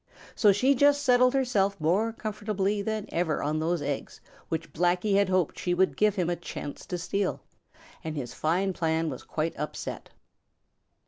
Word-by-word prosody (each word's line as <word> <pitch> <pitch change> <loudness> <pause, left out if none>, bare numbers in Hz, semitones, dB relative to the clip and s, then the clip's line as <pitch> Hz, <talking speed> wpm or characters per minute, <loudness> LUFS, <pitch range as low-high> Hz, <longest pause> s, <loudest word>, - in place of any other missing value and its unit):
So 210 - +5
she 255 +8 +3
just 285 +2 +4
settled 250 -1 +4
herself 205 -7 +1
more 190 +9 +2
comfortably 210 -2 -2
than 215 0 -2
ever 165 -2 -1
on 150 +2 0
those 165 0 0
eggs 140 -1 -4 0.3
which 165 +1 -4
Blacky 180 +4 +1
had 200 -1 +3
hoped 185 -4 +1
she 175 -1 0
would 190 +1 +2
give 210 -1 +2
him 180 -4 0
a 175 - 0
chance 145 -3 -7
to 180 - -3
steal, 195 +2 -1 0.6
and 160 -1 -4
his 125 -3 -5
fine 185 +7 0
plan 160 -2 0
was 130 - -7
quite 160 +1 -3
upset. 150 - -5
185 Hz, 170 wpm, -28 LUFS, 165-210 Hz, 0.6 s, So